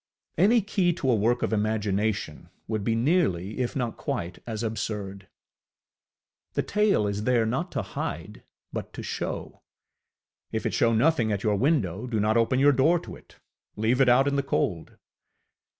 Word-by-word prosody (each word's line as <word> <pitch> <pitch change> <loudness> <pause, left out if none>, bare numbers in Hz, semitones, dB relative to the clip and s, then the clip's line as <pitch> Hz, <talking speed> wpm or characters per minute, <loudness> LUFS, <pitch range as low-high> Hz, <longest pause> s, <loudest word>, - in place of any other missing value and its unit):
Any 215 +7 +4
key 190 -3 +1
to 135 -6 0
a - - +4
work 115 +4 +1
of - - 0
imagination 105 -6 -1 0.2
would 110 -2 -2
be 115 +2 +1
nearly, 115 - +1
if 125 -2 -2
not 125 -4 -2
quite, 85 +1 -4
as 110 -1 -4
absurd. 100 -3 -4 1.3
The - - 0
tale 210 - +2
is 105 +1 -2
there, 120 -3 +3
not 130 +11 -2
to - - -1
hide, 85 +7 -6 0.3
but - - -5
to - - -7
show: - - -5 0.9
if - - -3
it - - -1
show 115 - +3
nothing 115 0 +2
at 100 -1 -2
your 105 -2 +2
window, 110 - 0
do 115 -3 -1
not 105 +1 +2
open 115 +2 +2
your 140 +2 +5
door 145 +6 +3
to 105 - -8
it; - - -18 0.4
leave 115 +5 +1
it 130 - +5
out 130 +3 +5
in 140 0 +1
the - - +3
cold. 90 -11 -2
115 Hz, 170 wpm, -26 LUFS, 105-135 Hz, 1.3 s, your